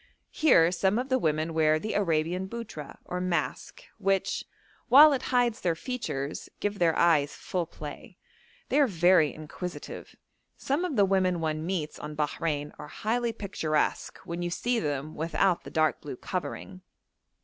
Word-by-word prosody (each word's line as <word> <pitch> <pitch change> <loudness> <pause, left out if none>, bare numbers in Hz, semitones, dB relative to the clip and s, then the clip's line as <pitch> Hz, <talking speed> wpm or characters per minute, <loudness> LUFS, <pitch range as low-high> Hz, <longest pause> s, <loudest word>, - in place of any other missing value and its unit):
Here 175 - +5
some 190 +3 +1
of 255 +2 -2
the 260 0 +2
women 155 -2 0
wear 155 -1 +3
the 215 +7 -4
Arabian 175 -1 0
buttra 225 -11 -7
or 180 0 -3
mask, 180 -2 -2 0.2
which, 195 -1 0 0.5
while 290 +4 +9
it 265 - -1
hides 245 -3 +2
their 170 -2 +1
features, 160 - -4
gives 205 0 -2
their 165 -2 +3
eyes 155 -4 +3
full 175 -3 -3
play. - - -9 0.5
They 285 - +3
are 285 - +5
very 175 - +4
inquisitive. 155 +3 -8 0.4
Some 290 +7 -1
of 325 -6 -3
the 200 -3 +5
women 185 -2 +2
one 155 -1 -2
meets 170 -5 -3
on 150 0 -7
Bahrein 150 0 -2
are 150 - -7
highly 235 +7 -1
picturesque 190 -8 -1
when 170 +1 -4
you 175 - -1
see 240 +7 0
them 145 -1 -3
without 170 +3 0
the - - -7
dark 155 0 +1
blue 145 - -6
covering. 185 +4 -5
175 Hz, 160 wpm, -28 LUFS, 155-215 Hz, 0.5 s, while